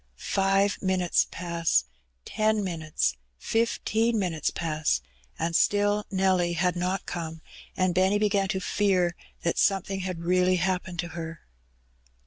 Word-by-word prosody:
Five 195 - +1
minutes 185 -2 +2
pass 170 - 0 0.2
— - - -45
ten 215 -1 +2
minutes 155 - -1
— - - -45
fifteen 225 - 0
minutes 175 -6 0
pass, 155 -2 0 0.4
and 165 +1 -1
still 205 +2 +2
Nelly 185 -2 +2
had 180 +1 +1
not 180 +2 -1
come, 165 -2 -5 0.3
and 185 -1 +2
Benny 190 +3 +3
began 205 -2 +1
to 190 -1 -1
fear 185 -3 +1 0.3
that 170 - 0
something 195 -1 +1
had 185 -3 -4
really 180 +1 +3
happened 180 0 -1
to 175 - -7
her. 165 0 -7
185 Hz, 135 wpm, -27 LUFS, 170-195 Hz, 0.4 s, Benny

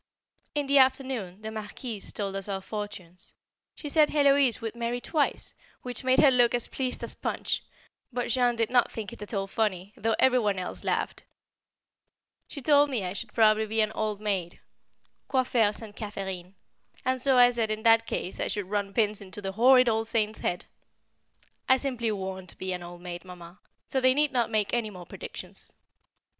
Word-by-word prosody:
In 290 -1 +1
the 280 0 +5
afternoon 255 -7 +1
the 220 - -4
Marquise 215 0 -5
told 195 -2 -3
us 195 0 -3
our 195 -1 -2
fortunes; 195 -4 -7 0.4
she 300 - -7
said 300 +1 +4
Héloise 280 -4 +4
would 225 -1 -4
marry 235 +1 -2
twice, 295 +3 -1 0.3
which 250 0 -3
made 255 0 +4
her 285 - +7
look 245 -1 +4
as 240 - -2
pleased 255 -2 -3
as - - -1
Punch, - - -2 0.5
but 245 -1 -2
Jean 245 0 +2
did 230 0 0
not 245 -1 +3
think 215 -4 -6
it - - -11
at 210 - -5
all 195 -3 -1
funny, 195 -2 -2
though 225 +1 0
every 255 -1 +4
one 205 -4 0
else 185 - -5
laughed - - -1 1.2
She 280 - -7
told 290 0 +5
me 245 -7 -1
I 180 0 -3
should 215 +2 -6
probably 220 -1 +4
be 220 +1 +1
an 215 0 +1
old 215 -2 -2
maid 195 -5 -2 0.7
("Coiffer 245 -5 +2
St. 210 -1 -10
Catherine"), 190 -3 -6 0.5
and 260 0 0
so 265 0 +3
I 245 0 +7
said 230 -2 -1
in 215 0 -2
that 225 -1 +5
case 185 - -3
I - - 0
should 205 -2 -3
run 200 -1 -1
pins 210 -2 +1
into 195 +1 -8
the 195 -1 -4
horrid 250 +4 +6
old 225 -1 +1
saint's 220 -1 0
head: 175 - -2 1.0
I 260 - +7
simply 250 -4 -1
won't 190 -2 -5
be 185 0 -3
an 180 - -5
old 175 0 -10
maid, 175 -1 -6
Mamma, 180 0 -12 0.3
so 265 - -1
they 255 0 +5
need 295 0 +3
not 245 -3 +1
make 215 -2 0
any 235 -3 0
more 180 -3 -10
predictions. - - -7
220 Hz, 190 wpm, -28 LUFS, 195-250 Hz, 1.2 s, her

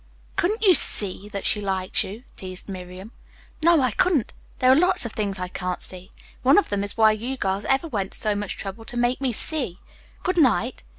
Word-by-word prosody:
"Couldn't 425 +6 0
you 380 - +7
'see' 205 - +2
that 200 -2 -6
she 210 - +2
liked 190 -2 0
you?" 210 +6 -9
teased 185 -1 -6
Miriam. 185 +2 -8 0.5
"No, 335 -1 +5
I 255 -2 +1
couldn't. 310 - +1 0.2
There 255 0 +4
are - - +7
lots 360 0 +3
of 235 - -4
things 200 -2 -2
I 180 0 -4
can't 180 0 -4
'see.' 185 +1 -5 0.3
One 270 +3 +5
of 410 - +3
them 200 -1 -1
is 205 - -3
why 220 -1 +6
you 240 +5 -4
girls 195 -2 -2
ever 270 +5 +1
went 200 -9 -3
to - - +3
so 215 - +2
much 205 -1 -4
trouble 200 +3 -7
to 245 -1 -6
make 245 +2 0
me 265 -2 +1
'see.' 245 - -1 0.4
Good 365 -1 0
night." 255 -3 +2
215 Hz, 215 wpm, -24 LUFS, 195-270 Hz, 0.5 s, you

